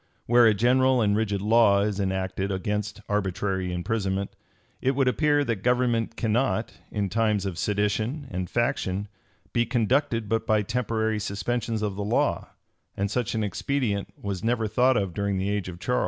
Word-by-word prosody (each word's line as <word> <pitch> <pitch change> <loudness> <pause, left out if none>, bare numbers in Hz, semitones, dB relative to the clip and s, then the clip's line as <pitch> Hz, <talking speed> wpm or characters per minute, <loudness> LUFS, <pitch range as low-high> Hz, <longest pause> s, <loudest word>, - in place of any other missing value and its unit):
Where 120 0 +6
a 110 - +5
general 130 +4 +3
and 105 -3 +2
rigid 100 -2 -1
law 105 -2 +5
is 105 -1 -1
enacted 95 0 -1
against 105 +2 -3
arbitrary 95 -2 -1
imprisonment, 95 +2 -2 0.5
it 135 +1 +1
would 135 -1 +2
appear 145 +2 +3
that 115 -5 -1
government 120 +1 +1
cannot, 115 0 0 0.2
in 105 -2 -1
times 105 0 +1
of 95 -3 -4
sedition 105 +7 -1
and 90 -1 -3
faction, 100 -4 -1 0.4
be 120 - +3
conducted 120 -1 +1
but 115 +2 -1
by 110 -1 +3
temporary 110 -1 -1
suspensions 110 +2 -2
of 100 -2 -2
the 105 - -2
law; 105 +3 0 0.5
and 100 0 -1
such 120 -2 -1
an 110 - 0
expedient 105 -1 -1
was 100 -3 -4
never 115 -1 +1
thought 125 +4 +3
of 95 -3 -1
during 100 0 -1
the 95 +2 -1
age 100 -2 -2
of 85 -1 -9
Charles. 125 +5 0
105 Hz, 170 wpm, -26 LUFS, 100-120 Hz, 0.5 s, Where